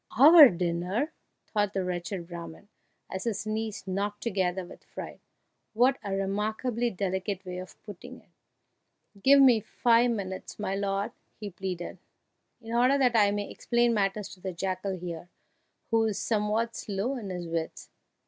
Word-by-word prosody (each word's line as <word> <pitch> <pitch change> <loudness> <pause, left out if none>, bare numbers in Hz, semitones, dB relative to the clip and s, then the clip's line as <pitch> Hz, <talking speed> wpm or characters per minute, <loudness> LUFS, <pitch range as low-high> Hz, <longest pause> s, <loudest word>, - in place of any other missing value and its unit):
"Our 300 +2 +10
dinner!" 180 - -1 0.3
thought 205 -2 -1
the 190 - -1
wretched 180 0 -4
Brahman, 170 +2 -9 0.4
as 190 +3 -5
his 220 -2 -2
knees 215 -1 -3
knocked 200 +2 -3
together 190 -4 -1
with - - -14
fright; - - -9 0.5
"what 250 +4 +3
a 195 -1 -2
remarkably 215 +5 -1
delicate 190 -1 -3
way 180 0 -5
of 185 0 -10
putting 205 -4 -10
it!" - - -27 0.9
"Give 280 +4 +7
me 255 -5 +7
five 235 +3 +3
minutes, 190 -5 -4
my 200 -2 -2
lord!" 200 +2 -1 0.3
he 210 -2 -6
pleaded, 180 -1 -5 0.6
"in 230 -1 -8
order 250 +4 +4
that 250 -3 +3
I 205 -2 +5
may 205 0 -3
explain 240 0 +1
matters 200 -1 0
to 185 - -13
the 185 0 -5
jackal 185 +2 -3
here, 175 -1 -7 0.6
who 225 -1 +3
is 215 -3 -1
somewhat 220 +1 0
slow 210 +6 -2
in 220 -6 -6
his 180 -2 -5
wits." 165 -1 -4
200 Hz, 155 wpm, -28 LUFS, 185-230 Hz, 0.9 s, Our